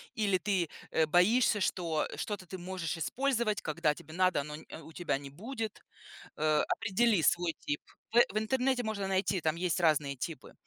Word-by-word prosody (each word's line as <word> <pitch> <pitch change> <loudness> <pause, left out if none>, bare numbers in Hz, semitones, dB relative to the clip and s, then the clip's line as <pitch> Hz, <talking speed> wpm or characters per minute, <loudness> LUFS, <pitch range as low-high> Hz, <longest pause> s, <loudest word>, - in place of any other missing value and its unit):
или 205 -5 +2
ты, 185 -3 0 0.2
а, 160 - +3
боишься, 210 +7 +4
что 170 -4 0
что-то 200 -4 -4
ты 185 - -6
можешь 175 -3 -4
использовать, 235 - 0
когда 155 0 +1
тебе 155 - -12
надо, 185 -4 +3
но 150 +1 -7
н 155 - -10 0.2
у 160 - -12
тебя 155 -5 -1
не 140 -1 -9
будет. 220 - -5 0.6
Э, 155 -1 +3
определи 210 -2 +2
свой 175 0 +2
тип. 145 - -2 0.3
В 240 +1 +8
в - - +2
интернете 250 +3 +1
можно 210 -4 -2
найти, 190 0 +1
там 160 -1 0
есть 180 0 0
разные 150 -4 +2
типы. 155 +5 -6
180 Hz, 175 wpm, -31 LUFS, 155-215 Hz, 0.6 s, В